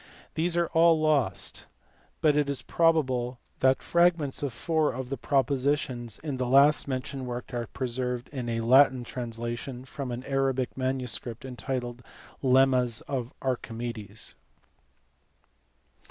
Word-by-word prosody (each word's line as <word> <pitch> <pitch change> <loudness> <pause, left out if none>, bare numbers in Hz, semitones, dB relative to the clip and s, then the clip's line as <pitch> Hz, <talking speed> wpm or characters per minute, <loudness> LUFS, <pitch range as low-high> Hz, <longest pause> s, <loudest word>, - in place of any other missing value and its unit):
These 170 +2 0
are 170 - +3
all 165 -1 +5
lost, 155 -5 0 0.5
but 150 -2 +4
it 145 -1 +2
is 140 - -3
probable 130 -7 +1 0.2
that 130 0 +3
fragments 170 -5 +2
of 140 -2 -1
four 155 +5 +1
of 125 0 -5
the - - 0
propositions 135 -4 0
in 145 -4 -4
the 125 -1 -1
last 140 +4 +5
mentioned 130 0 -4
work 125 +1 -6
are 120 -1 -2
preserved 125 -1 -2
in 125 -4 -4
a 115 0 -1
Latin 130 +1 +5
translation 120 +1 -5
from 140 -1 -6
an 120 +1 -5
Arabic 135 -2 0
manuscript 130 -2 -3
entitled 125 -1 -4 0.4
Lemmas 130 -3 +3
of 130 -3 -3
Archimedes. 115 -4 -3
130 Hz, 125 wpm, -28 LUFS, 120-140 Hz, 0.5 s, all